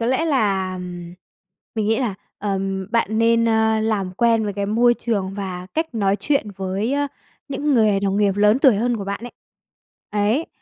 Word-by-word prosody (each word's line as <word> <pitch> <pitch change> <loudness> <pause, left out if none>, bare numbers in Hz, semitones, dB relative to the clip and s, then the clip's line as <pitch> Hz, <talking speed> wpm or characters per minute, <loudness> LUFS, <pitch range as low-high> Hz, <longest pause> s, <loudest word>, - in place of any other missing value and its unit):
có 230 - 0
lẽ 260 +6 +1
là 195 - 0 1.0
mình 215 -2 -1
nghĩ 225 +1 +2
là, 240 -7 -1 0.2
ờm, 195 -1 -2
bạn 220 -2 +1
nên, 230 0 +3
ơ, 220 0 +2
làm 210 -4 -1
quen 230 +2 +2
với 205 - -2
cái 200 0 -3
môi 240 +3 +3
trường 200 -6 -2
và 185 -3 -5
cách 320 -4 -2
nói 200 -3 +1
chuyện 275 -8 0
với, 195 +5 -2
ơ, 285 0 +1 0.4
những 285 0 0
người 215 -4 +3
đồng 195 0 0
nghiệp 200 -2 +2
lớn 210 +3 +4
tuổi 265 -6 +5
hơn 240 +3 0
của 200 - -5
bạn 200 +1 -4
ấy. 245 - -8 0.8
Ấy, 210 +9 +1
215 Hz, 185 wpm, -21 LUFS, 195-235 Hz, 1.0 s, tuổi